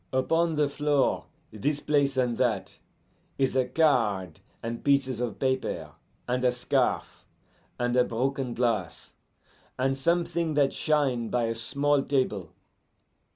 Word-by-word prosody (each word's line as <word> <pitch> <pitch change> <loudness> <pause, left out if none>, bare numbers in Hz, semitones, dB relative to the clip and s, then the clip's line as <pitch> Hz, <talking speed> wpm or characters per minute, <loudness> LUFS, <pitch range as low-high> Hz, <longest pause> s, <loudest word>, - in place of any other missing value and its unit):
Upon 165 +5 +1
the 150 -1 +2
floor, 145 0 +1 0.3
this 145 +8 -1
place 140 -3 +1
and 125 -2 +1
that, 115 -6 -1 0.6
is 135 -1 +1
a 130 -1 +3
card, 115 - +1 0.2
and 115 0 -4
pieces 135 -4 +2
of 120 -4 -3
paper, 130 -1 -1 0.4
and 125 +1 -1
a 125 - +4
scarf, 125 0 -1 0.5
and 120 0 0
a 125 - +5
broken 130 +1 -2
glass, 115 -8 -1 0.6
and 135 +1 +1
something 170 +1 0
that 140 -2 +3
shine 135 -7 +1
by 120 -1 0
a 115 0 0
small 140 +5 +1
table. 105 - -1
130 Hz, 130 wpm, -27 LUFS, 120-145 Hz, 0.6 s, a